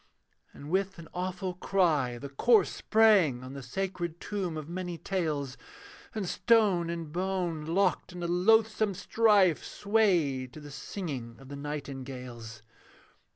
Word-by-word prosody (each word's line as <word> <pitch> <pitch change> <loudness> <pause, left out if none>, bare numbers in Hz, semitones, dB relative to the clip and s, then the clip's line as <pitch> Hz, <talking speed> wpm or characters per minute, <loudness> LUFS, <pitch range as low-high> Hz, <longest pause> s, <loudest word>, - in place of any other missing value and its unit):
And 145 +2 -10
with 190 0 0
an 165 -1 -10
awful 185 0 -3
cry, 165 -10 +1
the 140 - -7
corse 220 - +4
Sprang 195 - +4
on 130 +1 -8
the 140 - -7
sacred 175 +4 -4
tomb 185 -6 -3
of 155 -1 -6
many 175 0 -4
tales, 150 -9 -2 0.6
And 205 -4 -2
stone 200 -7 +3
and 165 -3 -4
bone, 175 -3 -2
locked 190 +3 +1
in 175 -1 -7
a - - -1
loathsome 215 +3 +3
strife, 200 -3 +3
Swayed 175 - +1
to - - -9
the 145 -1 -10
singing 135 - -5
of 135 -1 -13
the 140 - -6
nightingales. 130 -6 -7
170 Hz, 140 wpm, -29 LUFS, 140-195 Hz, 0.6 s, corse